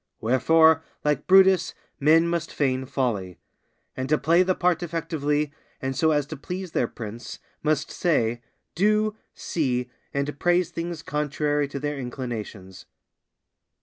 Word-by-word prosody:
Wherefore, 160 +7 +4 0.2
like 150 -1 0
Brutus, 190 -1 +5 0.2
men 160 +4 +5
must 170 -1 -2
feign 130 -2 0
folly; 105 - -2 0.6
and 130 0 -4
to 155 - +4
play 165 +5 +3
the 185 0 +2
part 180 -2 +1
effectively, 150 -3 -1 0.3
and 135 0 -3
so 160 +4 +3
as 145 -2 +2
to 155 - -7
please 180 +5 -6
their 120 - +1
prince, 115 0 -8 0.2
must 155 -1 0
say, 120 -9 0 0.3
do, 215 +3 +2 0.2
see, 125 -6 -2 0.2
and 140 +1 -3
praise 175 -1 +2
things 165 -1 -5
contrary 150 0 -1
to 140 0 -6
their 145 0 -3
inclinations. 115 -7 -6
150 Hz, 135 wpm, -25 LUFS, 130-165 Hz, 0.6 s, Brutus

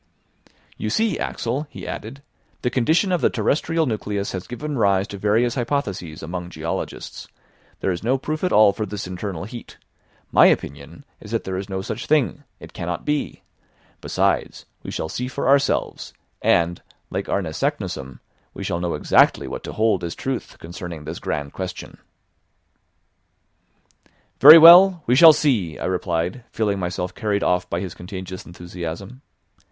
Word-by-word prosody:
"You 110 - -3
see, 220 - 0
Axel," 130 +6 -3
he - - -9
added, 140 +1 -7 0.4
"the 125 - 0
condition 160 - +2
of 180 - +1
the - - +4
terrestrial 155 +8 0
nucleus 105 -4 -3
has 95 -2 -6
given 145 +4 -5
rise 100 -2 +2
to 100 - -7
various 110 +4 +2
hypotheses 105 - -3
among 90 +2 -5
geologists; 80 -1 -6 0.5
there 95 - 0
is 90 - -4
no 125 +4 +1
proof 155 +5 -4
at 180 - +1
all 105 -2 +6
for 105 +1 -4
this 105 +1 -5
internal 90 -2 -5
heat; 115 +3 -10 0.5
my - - +7
opinion 70 - -2
is 105 - -12
that 115 0 -2
there 95 - -4
is 95 +1 -5
no 95 0 -3
such - - -5
thing, 145 -1 +1 0.2
it - - -12
cannot 85 -1 -5
be; 150 0 -2 0.6
besides - - -1 0.2
we - - -8
shall - - -3
see 125 +10 -4
for 130 - -3
ourselves, 140 +1 +1 0.3
and, 85 0 +2 0.3
like - - -4
Arne 100 -2 0
Saknussemm, 65 -4 -3 0.3
we - - -6
shall 85 - -2
know 85 -2 -2
exactly 75 - +3
what - - -6
to - - -6
hold 110 -5 +1
as 85 -1 -4
truth 130 -2 -5
concerning 85 -1 -8
this 80 +3 -6
grand 70 -1 -4
question." 90 -1 -7 2.4
"Very 150 +4 +11
well, 175 +1 +9
we 125 - +3
shall 160 +4 +10
see," 120 - 0
I - - -5
replied, 90 +4 -2
feeling 105 -3 -1
myself 90 0 -3
carried 105 -2 -1
off 90 0 0
by 85 - -2
his 95 -4 -5
contagious 95 0 -8
enthusiasm. 90 +6 -8
100 Hz, 160 wpm, -22 LUFS, 90-130 Hz, 2.4 s, Very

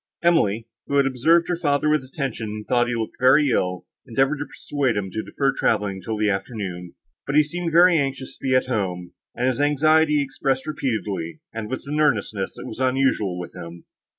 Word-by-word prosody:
Emily, 115 - +2 0.2
who 140 - -1
had 140 -1 +4
observed 160 +6 +3
her 175 - 0
father 145 -3 +1
with 150 -2 +2
attention 130 -4 -4
and 105 0 -7
thought 120 -1 +2
he 120 - -1
looked 110 -1 -4
very 135 +3 +5
ill, 90 -3 -1 0.2
endeavoured 135 +4 +1
to 145 - -4
persuade 135 -6 -2
him 95 -2 -3
to 110 - -3
defer 135 +4 -1
travelling 100 -3 0
till 110 +4 -4
the 105 0 +1
afternoon; 95 -3 -4 0.3
but 140 - -1
he 150 - +7
seemed 170 +3 -4
very 170 0 +6
anxious 135 -1 -3
to - - -24
be 130 -1 +1
at 130 - +3
home, 95 -8 -3 0.2
and 125 - -1
his 130 +1 0
anxiety 150 +1 +3
he 145 - +3
expressed 135 -1 -2
repeatedly, 105 - -3
and 110 -1 -5
with 130 - -4
an 150 +2 -2
earnestness 105 -8 0
that - - -9
was 110 - -8
unusual 130 -8 +1
with 90 -1 -7
him. 85 -1 -9
130 Hz, 205 wpm, -23 LUFS, 105-145 Hz, 0.3 s, he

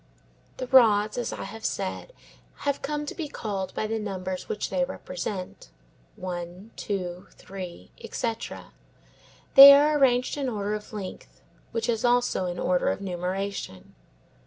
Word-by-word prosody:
The 255 - -3
rods, 215 -5 +5
as 245 - -2
I - - -5
have 225 0 -9
said, 195 - -3 0.5
have 285 -1 0
come 295 +1 -3
to - - -5
be 325 -4 -5
called 200 -8 -4
by - - -1
the 220 +1 -2
numbers 190 -3 -5
which 210 - -3
they 270 - +1
represent; 185 -7 -6 0.5
one, 180 +3 -7
two, 180 -3 -4
three, 185 -3 -9
etc. 230 -2 -4 0.8
They 275 +1 +12
are 295 +1 +4
arranged 255 0 +3
in 275 -3 -1
order 210 -2 -2
of 210 0 -6
length, 200 -4 -8 0.3
which 230 -1 -2
is 230 -1 0
also 245 -6 +2
in 175 0 -4
order 180 0 +1
of - - -2
numeration. 185 - -4
210 Hz, 145 wpm, -26 LUFS, 185-245 Hz, 0.8 s, They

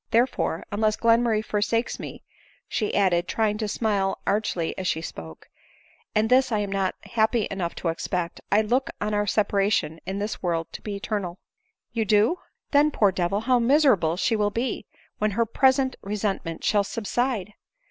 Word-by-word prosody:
Therefore, 235 -8 +1
unless 215 +1 +1
Glenmurray 230 -1 +3
forsakes 215 +3 0
me, - - -8 0.4
(she 215 - -1
added, 180 -3 +2
trying 215 -2 0
to 215 - -1
smile 200 -3 0
archly 200 -5 0
as 185 - -3
she 160 - 0
spoke,) 80 - -9 0.7
and 215 +1 +3
this 255 +1 +4
I 215 - +2
am 205 -1 -2
not 195 -1 0
happy 220 -1 +1
enough 180 -3 -3
to - - -4
expect, 170 +1 -3
I 210 +2 +4
look 250 +5 +1
on 210 +1 -2
our 205 0 +1
separation 200 -6 +1
in 195 - -2
this 205 +2 -3
world 170 -2 0
to - - -7
be 210 -2 -4
eternal." 200 -3 -3 0.3
" - - -50
You 225 -2 0
do?— 215 - +3 0.3
Then, 290 +1 +5
poor 210 -9 +3
devil, 185 +2 0
how 250 +1 +3
miserable 235 - +3
she 225 - +1
will 210 -1 +2
be, 235 +5 -3 0.3
when 215 - +2
her 230 - +3
present 265 +2 +2
resentment 195 -5 -3
shall 205 -2 +3
subside 220 -1 -2
210 Hz, 170 wpm, -25 LUFS, 195-230 Hz, 0.7 s, Then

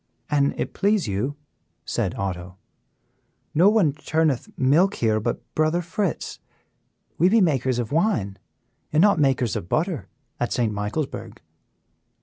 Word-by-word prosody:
"An' 140 -1 +2
it - - -3
please 205 - +1
you," 105 +9 -2 0.5
said - - -1
Otto, 90 -1 -4 1.0
"no 175 +6 +6
one 200 -10 +3
churneth 155 -3 0
milk 155 +9 +3
here 110 -2 +1
but 115 +2 -3
Brother 155 +3 +1
Fritz; 180 +1 -3 0.8
we 175 +4 +5
be 225 +3 +5
makers 130 - +2
of 120 0 -3
wine 150 - 0 0.5
and 150 - +2
not 200 -3 +5
makers 130 -5 +2
of 85 - -5
butter, 165 -2 -1 0.3
at 120 - -1
St. 115 -3 0
Michaelsburg." 105 +9 -4
145 Hz, 130 wpm, -24 LUFS, 115-175 Hz, 1.0 s, no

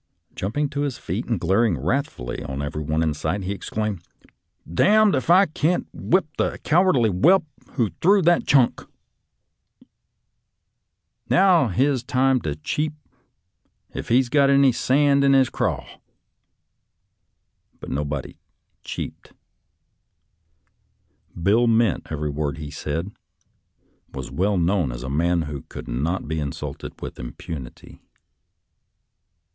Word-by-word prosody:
Jump 100 +8 -4
ing 150 0 +2
to 140 +1 -4
his 140 -4 -2
feet 95 +8 -4
and 115 -6 -1
glaring 95 +1 +2
wrathfully 75 - -3
on 70 -1 -5
every 75 +1 -4
body 80 +2 0
in 80 -2 0
sight, 80 +7 -3
he 95 - -3
exclaimed, 105 -1 -3 0.4
" - - -32
D 85 - +1
d 215 +1 +5
if 130 +3 -1
I 185 +3 +7
can't 160 +1 0
whip 185 +2 +1
the - - 0
cowardly 155 - +3
whelp 165 - +4 0.3
who 115 -8 0
threw 195 +2 +4
that 175 +1 +3
chunk! 135 -4 +3 2.5
Now's 175 - +4
his 135 0 +2
time 130 +1 +1
to 75 -2 -3
cheep, 150 - -2 1.0
if - - -6
he's 125 +2 +4
got 140 +2 +3
any 140 -1 +5
sand 140 +3 +2
in 140 0 +4
his 135 -2 +4
craw." - - -1 1.9
But - - -8
nobody 70 -1 -4 0.2
" - - -49
cheeped." - - -7 2.1
Bill 110 +8 +3
meant 115 -4 +2
every 75 -1 -3
word 75 +1 -3
he 75 -2 -7
said, 80 +3 -3 1.0
and - - -17
was 65 -2 -6
well 100 +2 0
known 85 -4 +1
as - - -7
a 65 - -5
man 85 +3 +1
who 75 -2 -6
could - - -8
not 75 +10 -2
be 80 +1 -2
insulted 70 -2 -6
with - - -7
impunity. 60 +2 -9
105 Hz, 135 wpm, -23 LUFS, -, 2.5 s, I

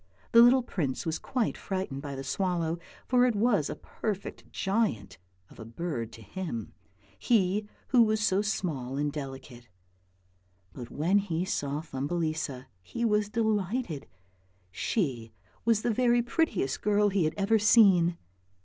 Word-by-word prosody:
The 230 - +8
little 250 +2 +6
prince 145 - -3
was 160 -1 -2
quite 255 -5 -1
frightened 185 -8 -4
by 140 -1 -6
the 135 - -5
swallow, 170 -1 -1 0.3
for 250 0 +4
it 240 - 0
was 205 -8 +2
a - - -4
perfect 205 -3 -6
giant 110 - -1 0.3
of - - -16
a - - -6
bird 115 -1 -4
to 115 - -11
him, 115 - -5 0.5
he 205 -2 +2 0.2
who 250 - +5
was 215 -1 +3
so 200 -2 +2
small 150 -11 -2
and 145 0 -1
delicate, 135 -4 -8 1.0
but 120 -2 -8
when 175 +7 +2
he 180 -3 -2
saw 145 -5 -2
Thumbelisa 155 -2 -3 0.2
he 235 - -3
was 210 -2 +2
delighted; 210 - -1 0.6
she 120 - -2 0.3
was 230 -2 +3
the 235 - +1
very 240 0 +3
prettiest 235 - 0
girl 210 0 +3
he 190 -4 +1
had 155 - -1
ever 210 +3 +3
seen. 190 -6 +5
185 Hz, 145 wpm, -29 LUFS, 140-215 Hz, 1.0 s, The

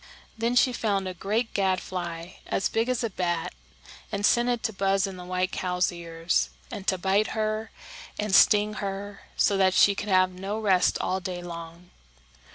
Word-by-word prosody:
Then 230 +2 0
she 250 0 +4
found 200 -5 0
a 185 - -4
great 215 +6 -2
gadfly, 180 -3 -2 0.2
as 195 - 0
big 225 +2 0
as 250 -1 0
a 230 - 0
bat, 175 -3 -2 0.6
and 200 0 0
sent 240 +2 +3
it 240 -2 -1
to 220 - -1
buzz 195 0 +1
in 195 -1 -6
the 180 - -9
white 185 +1 -1
cow's 180 0 0
ears, 165 -1 -1 0.2
and 195 - -7
to 190 - +2
bite 195 +4 +1
her 215 0 -1 0.5
and 210 -2 -2
sting 210 +1 +5
her 200 0 -5 0.2
so 200 - +3
that 190 -1 +3
she 200 - +6
could 205 +1 -5
have 185 -1 +4
no 195 +3 -4
rest 195 -4 +3
all 185 - -1
day 180 -1 -5
long. 170 0 -9
195 Hz, 180 wpm, -26 LUFS, 180-210 Hz, 0.6 s, she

